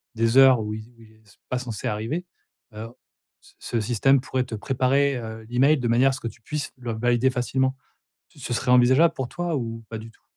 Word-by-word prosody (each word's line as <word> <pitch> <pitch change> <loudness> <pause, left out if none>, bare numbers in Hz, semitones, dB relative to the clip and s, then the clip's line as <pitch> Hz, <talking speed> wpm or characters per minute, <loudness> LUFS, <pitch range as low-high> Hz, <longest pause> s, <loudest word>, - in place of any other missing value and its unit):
des 115 +2 +1
heures 135 -2 +7
où 105 0 -4
il 110 - -7
z - - -17
où - - -19
il 110 -1 -17
est 110 -1 -26
s 100 - -22
pas 125 - -1
censé 120 -5 -5
arriver, 115 +12 -3 0.5
heu, 110 +1 -6 0.5
ce - - -21
ce 120 - -3
système 125 +5 +3
pourrait 130 0 -2
te 120 - -6
préparer, 135 +4 +1
heu, 110 -1 -8
l'email 135 +5 +3
de 125 -3 -2
manière 120 +3 +4
à - - -1
ce 130 - -6
que - - -4
tu 115 - -10
puisses 150 +6 -5
le 120 -2 -5
valider 120 +3 +2
facilement. 130 +1 -1 0.5
Tu - - -22
ce 125 -1 -5
serait 125 - -1
envisageable 130 +7 +5
pour 130 -2 -4
toi 175 0 -3
ou 115 -2 -4
pas 110 - -5
du 110 +1 -10
tout? - - -29
125 Hz, 235 wpm, -24 LUFS, 115-135 Hz, 0.5 s, heures